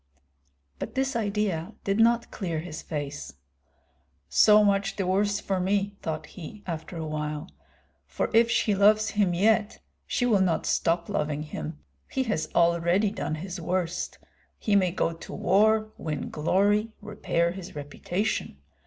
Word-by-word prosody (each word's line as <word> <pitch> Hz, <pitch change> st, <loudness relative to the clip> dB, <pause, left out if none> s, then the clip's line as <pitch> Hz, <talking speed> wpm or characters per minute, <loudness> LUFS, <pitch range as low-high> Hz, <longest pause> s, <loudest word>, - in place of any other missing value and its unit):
But -, -, -6 dB
this 265 Hz, 0 st, 0 dB
idea 205 Hz, -4 st, -1 dB
did 195 Hz, +2 st, 0 dB
not 235 Hz, +1 st, +3 dB
clear 170 Hz, -7 st, -3 dB
his 155 Hz, -2 st, -7 dB
face. 145 Hz, -, -5 dB, 1.0 s
"So 210 Hz, 0 st, +6 dB
much 200 Hz, -1 st, +1 dB
the 195 Hz, -, -1 dB
worse 200 Hz, +2 st, +1 dB
for 195 Hz, -2 st, -1 dB
me," 200 Hz, +2 st, 0 dB
thought 155 Hz, -1 st, -3 dB
he, 190 Hz, +6 st, -10 dB
after 165 Hz, 0 st, -5 dB
a 160 Hz, -, -3 dB
while; 150 Hz, -, -4 dB, 0.6 s
"for -, -, -2 dB
if 230 Hz, +1 st, +5 dB
she 220 Hz, -2 st, +2 dB
loves 210 Hz, +2 st, +4 dB
him 195 Hz, -4 st, +1 dB
yet, 215 Hz, +3 st, +2 dB, 0.3 s
she 245 Hz, -, 0 dB
will 215 Hz, -5 st, +3 dB
not 175 Hz, -4 st, +1 dB
stop 170 Hz, 0 st, +1 dB
loving 150 Hz, 0 st, -1 dB
him. 80 Hz, -, -6 dB, 0.3 s
He 265 Hz, -, 0 dB
has 160 Hz, -10 st, -2 dB
already 170 Hz, +4 st, +3 dB
done 155 Hz, -, -3 dB
his 180 Hz, +2 st, -6 dB
worst. 175 Hz, 0 st, -2 dB, 0.4 s
He 210 Hz, -, +1 dB
may 190 Hz, -2 st, +4 dB
go 170 Hz, -1 st, -1 dB
to 165 Hz, -, -10 dB
war, 215 Hz, +3 st, +3 dB
win 150 Hz, -3 st, -4 dB
glory, 205 Hz, +7 st, +2 dB
repair 205 Hz, -5 st, -1 dB
his 185 Hz, -2 st, -9 dB
reputation. 150 Hz, -, -3 dB
190 Hz, 150 wpm, -27 LUFS, 165-210 Hz, 1.0 s, So